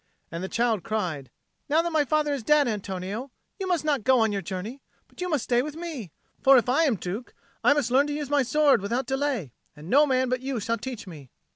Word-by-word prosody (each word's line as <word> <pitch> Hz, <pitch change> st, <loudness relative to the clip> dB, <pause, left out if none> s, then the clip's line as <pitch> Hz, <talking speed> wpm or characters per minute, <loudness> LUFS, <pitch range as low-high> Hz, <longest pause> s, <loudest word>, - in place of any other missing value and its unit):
And 170 Hz, +2 st, -5 dB
the 190 Hz, -, -4 dB
child 230 Hz, -4 st, +1 dB
cried, 170 Hz, -, -3 dB, 0.4 s
"Now 315 Hz, +3 st, +3 dB
that 340 Hz, -, -2 dB
my 310 Hz, -2 st, +2 dB
father 300 Hz, 0 st, +1 dB
is 275 Hz, -, -3 dB
dead, 295 Hz, +3 st, +4 dB
Antonio, 205 Hz, +3 st, -4 dB, 0.3 s
you 380 Hz, -, -3 dB
must 350 Hz, -4 st, 0 dB
not 285 Hz, -7 st, +1 dB
go 260 Hz, +1 st, +4 dB
on 220 Hz, -1 st, +2 dB
your 200 Hz, -1 st, -2 dB
journey, 200 Hz, +9 st, -6 dB, 0.3 s
but -, -, -14 dB
you 360 Hz, -, -2 dB
must 295 Hz, -7 st, 0 dB
stay 240 Hz, 0 st, +2 dB
with 300 Hz, +3 st, -6 dB
me. 315 Hz, -, -6 dB, 0.3 s
For 270 Hz, 0 st, +7 dB
if 245 Hz, -, +2 dB
I 285 Hz, +7 st, +3 dB
am 265 Hz, -7 st, +2 dB
Duke, 195 Hz, +6 st, -6 dB, 0.3 s
I -, -, +6 dB
must 280 Hz, -5 st, -1 dB
learn 275 Hz, +3 st, +4 dB
to 295 Hz, -, -3 dB
use 295 Hz, -1 st, -3 dB
my 290 Hz, +1 st, +2 dB
sword 280 Hz, -2 st, +3 dB
without 235 Hz, +6 st, -1 dB
delay, 265 Hz, -, -2 dB, 0.2 s
and 155 Hz, +4 st, -10 dB
no 290 Hz, +3 st, +6 dB
man 260 Hz, -1 st, +2 dB
but 255 Hz, 0 st, -1 dB
you 265 Hz, -2 st, -3 dB
shall 230 Hz, +2 st, -2 dB
teach 255 Hz, -6 st, -6 dB
me." 150 Hz, -8 st, -11 dB
255 Hz, 240 wpm, -26 LUFS, 210-290 Hz, 0.4 s, For